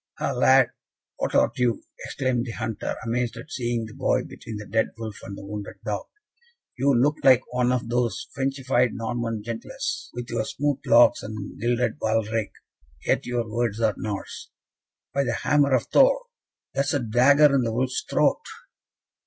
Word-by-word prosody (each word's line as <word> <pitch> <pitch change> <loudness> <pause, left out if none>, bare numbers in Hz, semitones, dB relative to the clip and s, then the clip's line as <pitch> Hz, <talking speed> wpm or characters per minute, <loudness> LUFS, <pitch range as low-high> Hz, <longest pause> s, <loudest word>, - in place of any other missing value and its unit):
"Ha, - - -1
lad! 130 -1 +4 0.5
what - - -2
art - - +4
thou?" 120 -3 +1 0.3
exclaimed 130 -3 -1
the - - -4
hunter, 110 -1 -3
amazed 120 0 -1
at 155 - -10
seeing 120 -6 -2
the 110 - -11
boy - - +1
between 110 -2 -8
the 105 - -7
dead 110 +2 +1
wolf 110 -2 -6
and 100 0 -8
wounded 100 +1 -7
dog. 105 -2 -3 0.7
"You 135 +1 +2
look 145 +4 +2
like 130 -1 +6
one 125 0 +2
of 125 -2 -1
those 120 -1 -1
Frenchified 135 -2 0
Norman 115 -2 -3
gentilesse, 265 - -4
with 120 0 -6
your 115 -2 0
smooth 145 +4 -1
locks 120 +1 +6
and 110 -2 -7
gilded 120 -1 0
baldrick, 110 -1 0 0.5
yet - - +1
your 120 -2 -1
words 115 -1 -1
are 110 -2 +2
Norse. 105 -3 -6 0.6
By 140 +1 +2
the - - -1
hammer 145 -2 +3
of 125 - +1
Thor! - - +5 0.5
that 140 +1 +1
is 145 - 0
a - - +2
dagger 135 +5 +5
in 135 - +4
the 115 -2 -1
wolf's 125 +2 -1
throat!" - - +2
120 Hz, 170 wpm, -25 LUFS, 110-130 Hz, 0.7 s, like